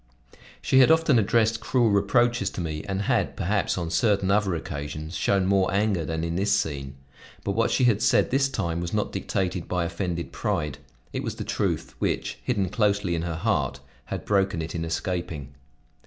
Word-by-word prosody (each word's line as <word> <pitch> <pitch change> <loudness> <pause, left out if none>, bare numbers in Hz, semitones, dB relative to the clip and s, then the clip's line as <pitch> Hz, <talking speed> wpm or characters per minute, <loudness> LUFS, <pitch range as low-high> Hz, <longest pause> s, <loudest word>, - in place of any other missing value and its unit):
She 130 - +4
had 130 - +7
often 160 -6 +5
addressed 110 +1 +2
cruel 120 -4 +2
reproaches 120 +5 +2
to - - -4
me 80 -2 -4
and 95 0 -2
had, - - +1
perhaps, 100 +1 0
on 85 -2 -3
certain 100 +1 +2
other 100 -3 +2
occasions 75 +1 -5
shown 100 -2 +2
more 95 -1 +2
anger 100 -3 +1
than 80 +1 -3
in 85 0 -2
this 100 +2 +1
scene; 70 -8 -2 0.5
but 100 - -1
what 115 +4 +1
she 130 - +1
had 115 -4 +3
said - - +3
this 135 +1 +2
time 85 -9 -2
was 85 +3 -3
not 105 - 0
dictated 95 -2 -2
by 90 -2 0
offended 85 -1 -3
pride; 75 -3 -2 0.3
it - - -2
was - - -4
the - - -5
truth, - - -2
which, - - -2
hidden 100 -7 0
closely 100 -3 +1
in 85 - -1
her 85 -1 -3
heart, 70 -3 0 0.3
had - - -5
broken 100 -2 +1
it 80 0 -4
in 85 - -2
escaping. 80 -4 -3
95 Hz, 185 wpm, -26 LUFS, 85-105 Hz, 0.5 s, had